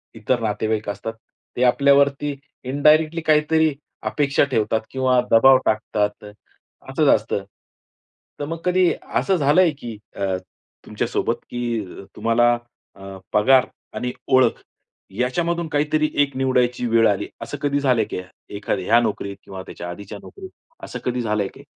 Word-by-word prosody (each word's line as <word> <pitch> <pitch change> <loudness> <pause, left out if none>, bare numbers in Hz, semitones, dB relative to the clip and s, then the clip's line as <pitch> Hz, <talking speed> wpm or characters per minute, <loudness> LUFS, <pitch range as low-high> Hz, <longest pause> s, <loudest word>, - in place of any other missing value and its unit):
इतर 115 +3 0
नातेवाईक 110 0 -1
असतात 115 +2 -5 0.4
ते 125 - +1
आपल्यावरती 140 +3 +3 0.3
इंडायरेक्टली 155 +5 +3
काहीतरी 155 0 +3 0.4
अपेक्षा 145 -1 +2
ठेवतात 110 -2 +1
किंवा 130 -1 +2
दबाव 130 +4 +7
टाकतात. 105 -1 -1 0.7
असंच - - +1
असतं. 100 - -3 1.0
तर 145 - -2
मग 165 +3 -4
कधी 180 -1 +3
असं 195 - 0
झालंय 155 +4 +4
की 115 -3 -7 0.2
अ, 95 -1 -1 0.5
तुमच्यासोबत - - -1
की 120 -1 -2
अ, 95 - -11
तुम्हाला 120 +1 +3 0.4
अ, 95 0 -10 0.2
पगार 125 +5 +5 0.3
आणि 125 0 -3
ओळख 130 -3 +3 0.6
याच्यामधून 170 +7 0
काहीतरी 155 +1 +1
एक 140 -2 0
निवडायची 125 -2 +1
वेळ 115 0 +4
आली, 100 -2 -1
असं 145 - -5
कधी 145 -1 +1
झालंय 125 -5 +2
का? - - -2 0.4
एखाद्या 100 -2 -2
या 115 +2 +6
नोकरीत 100 -3 -3
किंवा 95 -1 -8
त्याच्या 85 -1 -8
आधीच्या 100 +3 -8
नोकरीत, 385 -1 -11 0.3
असं - - -6
कधी 125 0 -1
झालंय 105 -3 0
का? - - -13
125 Hz, 140 wpm, -22 LUFS, 110-145 Hz, 1.0 s, दबाव